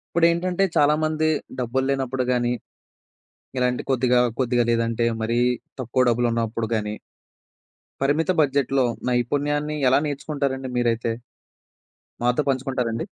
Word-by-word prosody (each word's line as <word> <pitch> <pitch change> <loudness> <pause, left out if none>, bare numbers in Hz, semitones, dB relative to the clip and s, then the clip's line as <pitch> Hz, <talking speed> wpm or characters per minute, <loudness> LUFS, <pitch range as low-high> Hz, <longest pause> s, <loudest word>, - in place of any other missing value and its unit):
ఇప్పుడేంటంటే, 170 +2 +2
చాలామంది 155 +1 +2 0.3
డబ్బులు 130 +2 0
లేనప్పుడు 130 -1 0
గాని, 120 -1 +1 1.0
ఇలాంటి 125 0 0
కొద్దిగా 125 -1 +3 0.2
కొద్దిగా 120 -2 +2
లేదంటే, 115 0 +1 0.2
మరీ 115 +2 +1 0.4
తక్కువ 130 +1 +1
డబ్బులు 120 +1 +2
ఉన్నప్పుడు 115 -1 -1
గానీ... 105 0 -3 1.1
పరిమిత 145 +5 +1
బడ్జెట్‌లో 135 -2 +2 0.2
నైపుణ్యాన్ని 145 +5 0
ఎలా 130 - +4
నేర్చుకుంటారండి 140 -2 -3
మీరైతే? 115 -1 +1 1.1
మాతో 125 +4 +2
పంచుకుంటారండి? 130 -3 -1
130 Hz, 100 wpm, -23 LUFS, 120-145 Hz, 1.1 s, ఎలా